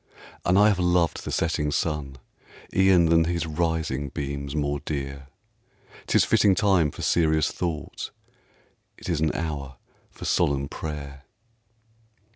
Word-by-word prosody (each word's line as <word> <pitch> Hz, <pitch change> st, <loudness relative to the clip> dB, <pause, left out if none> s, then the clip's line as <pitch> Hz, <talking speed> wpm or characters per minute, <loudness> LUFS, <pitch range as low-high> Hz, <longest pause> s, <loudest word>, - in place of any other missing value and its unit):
And 90 Hz, +2 st, +3 dB
I 105 Hz, +1 st, +7 dB
have 100 Hz, -3 st, +1 dB
loved 90 Hz, -2 st, +1 dB
the -, -, -4 dB
setting 80 Hz, -2 st, 0 dB
sun, 75 Hz, -2 st, -2 dB, 0.6 s
E'en 95 Hz, -2 st, +5 dB
than 80 Hz, 0 st, +4 dB
his 85 Hz, 0 st, -1 dB
rising 80 Hz, -4 st, -1 dB
beams 70 Hz, +1 st, -4 dB
more 70 Hz, -1 st, -1 dB
dear; 70 Hz, -1 st, -5 dB, 0.8 s
'Tis -, -, +4 dB
fitting 100 Hz, -3 st, +4 dB
time 95 Hz, -5 st, +3 dB
for -, -, -8 dB
serious 80 Hz, -2 st, +2 dB
thought, 85 Hz, -4 st, -4 dB, 0.9 s
It -, -, -8 dB
is 85 Hz, -3 st, 0 dB
an 80 Hz, -1 st, +2 dB
hour 70 Hz, -5 st, -4 dB, 0.3 s
for -, -, -10 dB
solemn 70 Hz, -1 st, +1 dB
prayer. 70 Hz, -3 st, -7 dB
80 Hz, 130 wpm, -25 LUFS, 70-85 Hz, 0.9 s, I